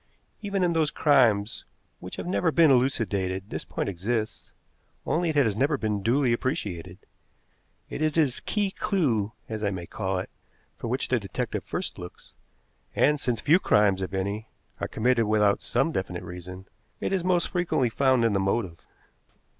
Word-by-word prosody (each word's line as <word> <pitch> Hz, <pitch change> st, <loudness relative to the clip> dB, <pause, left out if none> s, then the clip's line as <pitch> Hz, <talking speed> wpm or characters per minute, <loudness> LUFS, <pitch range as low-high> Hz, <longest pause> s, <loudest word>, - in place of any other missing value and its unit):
Even 200 Hz, -2 st, -1 dB
in 175 Hz, -1 st, +2 dB
those 160 Hz, -2 st, +2 dB
crimes 120 Hz, -9 st, +3 dB, 0.4 s
which 90 Hz, -, -8 dB
have -, -, -6 dB
never 175 Hz, -2 st, +1 dB
been 160 Hz, -2 st, +5 dB
elucidated 100 Hz, -7 st, 0 dB
this -, -, -4 dB
point -, -, -4 dB
exists, 105 Hz, +4 st, -3 dB, 0.6 s
only 170 Hz, +1 st, +1 dB
it 155 Hz, -, -1 dB
has 120 Hz, -8 st, +3 dB
never 140 Hz, +6 st, +1 dB
been 105 Hz, -4 st, -1 dB
duly 125 Hz, +3 st, +2 dB
appreciated. 95 Hz, -, -3 dB, 0.9 s
It -, -, -6 dB
is 155 Hz, -1 st, +2 dB
this 145 Hz, -6 st, +2 dB
key 205 Hz, -2 st, -1 dB
clew, 120 Hz, -, 0 dB
as 110 Hz, -1 st, -5 dB
I 100 Hz, -, +2 dB
may 90 Hz, -3 st, -5 dB
call 95 Hz, +2 st, -2 dB
it, 90 Hz, -, -5 dB, 0.4 s
for -, -, -6 dB
which -, -, -1 dB
the -, -, +2 dB
detective -, -, -4 dB
first -, -, -4 dB
looks, 90 Hz, 0 st, -11 dB, 0.6 s
and, 150 Hz, 0 st, +3 dB
since 120 Hz, -5 st, -1 dB
few 165 Hz, +5 st, +5 dB
crimes, 105 Hz, -, +3 dB
if 95 Hz, -, -3 dB
any, 100 Hz, +3 st, -2 dB, 0.3 s
are -, -, -2 dB
committed 120 Hz, 0 st, +2 dB
without 105 Hz, -1 st, +3 dB
some -, -, 0 dB
definite -, -, -3 dB
reason, 90 Hz, +2 st, -9 dB, 0.3 s
it -, -, -2 dB
is 190 Hz, -3 st, 0 dB
most 180 Hz, -1 st, +1 dB
frequently 170 Hz, -9 st, 0 dB
found 130 Hz, -1 st, +3 dB
in 115 Hz, -, +2 dB
the 100 Hz, -, +2 dB
motive. 95 Hz, -3 st, -1 dB
115 Hz, 170 wpm, -26 LUFS, 100-150 Hz, 0.9 s, been